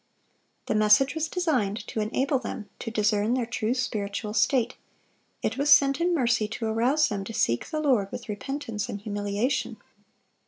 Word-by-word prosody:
The -, -, -1 dB
message 215 Hz, +5 st, +4 dB
was 320 Hz, 0 st, -1 dB
designed 250 Hz, -, -1 dB
to -, -, -3 dB
enable 265 Hz, +6 st, 0 dB
them 225 Hz, -3 st, -6 dB
to 230 Hz, -, -4 dB
discern 210 Hz, +1 st, +1 dB
their 250 Hz, -2 st, 0 dB
true 225 Hz, +1 st, -1 dB
spiritual 210 Hz, -4 st, -3 dB
state; 245 Hz, +2 st, +2 dB, 0.7 s
it -, -, -1 dB
was 285 Hz, +1 st, +1 dB
sent 275 Hz, +1 st, +6 dB
in 350 Hz, 0 st, +2 dB
mercy 235 Hz, -6 st, +2 dB
to 225 Hz, +1 st, -5 dB
arouse 245 Hz, +7 st, +2 dB
them 200 Hz, -2 st, -3 dB
to 225 Hz, -, -7 dB
seek 120 Hz, -, +1 dB
the 310 Hz, -, -3 dB
Lord 250 Hz, -10 st, +1 dB
with -, -, -7 dB
repentance 225 Hz, 0 st, -4 dB
and 205 Hz, -, -4 dB
humiliation. 205 Hz, +5 st, -2 dB
230 Hz, 165 wpm, -26 LUFS, 210-270 Hz, 0.7 s, sent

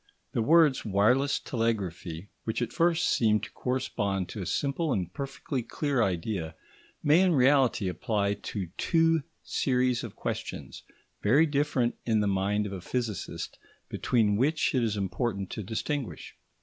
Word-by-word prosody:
The 115 Hz, -, 0 dB
words 155 Hz, +2 st, +5 dB
"wireless 120 Hz, +8 st, +3 dB
telegraphy," 100 Hz, -6 st, -3 dB
which 110 Hz, -, -2 dB
at 120 Hz, -2 st, -2 dB
first 170 Hz, 0 st, +2 dB
seem 110 Hz, -2 st, +3 dB
to -, -, -7 dB
correspond 105 Hz, -7 st, -2 dB
to 105 Hz, -, -6 dB
a 90 Hz, -, -4 dB
simple 145 Hz, +3 st, 0 dB
and 90 Hz, -5 st, -1 dB
perfectly 135 Hz, -1 st, -4 dB
clear 140 Hz, +2 st, -1 dB
idea, 90 Hz, -4 st, -1 dB, 0.5 s
may 155 Hz, +4 st, +5 dB
in 185 Hz, -3 st, +4 dB
reality 130 Hz, -6 st, +4 dB
apply 100 Hz, +2 st, 0 dB
to 100 Hz, -3 st, -5 dB
two 165 Hz, -1 st, +3 dB, 0.2 s
series 125 Hz, -2 st, +1 dB
of -, -, -7 dB
questions, -, -, -5 dB, 0.4 s
very 135 Hz, +10 st, +5 dB
different 140 Hz, -5 st, 0 dB
in 110 Hz, -2 st, +2 dB
the 105 Hz, -, +1 dB
mind 100 Hz, +2 st, +1 dB
of 100 Hz, -, -5 dB
a 95 Hz, -, -5 dB
physicist, 115 Hz, -2 st, -4 dB, 0.3 s
between 105 Hz, -4 st, +1 dB
which 145 Hz, +6 st, +2 dB
it 130 Hz, -, +2 dB
is 110 Hz, -3 st, 0 dB
important 100 Hz, 0 st, -2 dB
to 110 Hz, -, -4 dB
distinguish. 115 Hz, +6 st, -4 dB
115 Hz, 150 wpm, -28 LUFS, 100-140 Hz, 0.5 s, words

